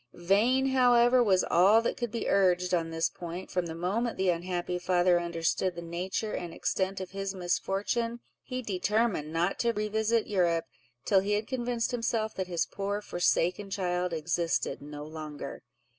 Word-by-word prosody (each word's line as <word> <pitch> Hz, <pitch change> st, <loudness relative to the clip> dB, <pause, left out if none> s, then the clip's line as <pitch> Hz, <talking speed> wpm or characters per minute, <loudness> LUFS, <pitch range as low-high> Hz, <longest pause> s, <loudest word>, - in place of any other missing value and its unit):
Vain, 225 Hz, +10 st, +2 dB
however, 245 Hz, -1 st, +5 dB
was 190 Hz, -4 st, +3 dB
all 195 Hz, +6 st, +5 dB
that -, -, 0 dB
could 240 Hz, -1 st, -3 dB
be 230 Hz, +1 st, -3 dB
urged 180 Hz, -2 st, +2 dB
on 165 Hz, -2 st, +1 dB
this 165 Hz, 0 st, 0 dB
point; 175 Hz, +1 st, -7 dB
from 180 Hz, -2 st, -1 dB
the 160 Hz, -, -6 dB
moment 205 Hz, +8 st, -1 dB
the 190 Hz, -1 st, +3 dB
unhappy 175 Hz, +1 st, -2 dB
father 180 Hz, 0 st, +3 dB
understood 170 Hz, +1 st, -1 dB
the 170 Hz, -, -6 dB
nature 185 Hz, +5 st, -3 dB
and 175 Hz, -2 st, -5 dB
extent 190 Hz, 0 st, -1 dB
of 185 Hz, -, -6 dB
his 195 Hz, 0 st, -4 dB
misfortune, 200 Hz, +6 st, -1 dB, 0.2 s
he 255 Hz, -1 st, -5 dB
determined 205 Hz, -5 st, 0 dB
not 170 Hz, +4 st, 0 dB
to 235 Hz, -1 st, +2 dB
revisit 220 Hz, +1 st, 0 dB
Europe 170 Hz, -4 st, +1 dB, 0.4 s
till 195 Hz, -, +4 dB
he 200 Hz, +2 st, -1 dB
had 210 Hz, +1 st, 0 dB
convinced 245 Hz, -2 st, -2 dB
himself 230 Hz, -2 st, -1 dB
that 190 Hz, -1 st, -3 dB
his 175 Hz, -2 st, 0 dB
poor 200 Hz, +1 st, -3 dB
forsaken 180 Hz, 0 st, 0 dB
child 180 Hz, -2 st, -1 dB
existed 165 Hz, 0 st, -1 dB
no 145 Hz, 0 st, -8 dB
longer. 155 Hz, -2 st, -7 dB
190 Hz, 165 wpm, -29 LUFS, 175-220 Hz, 0.4 s, however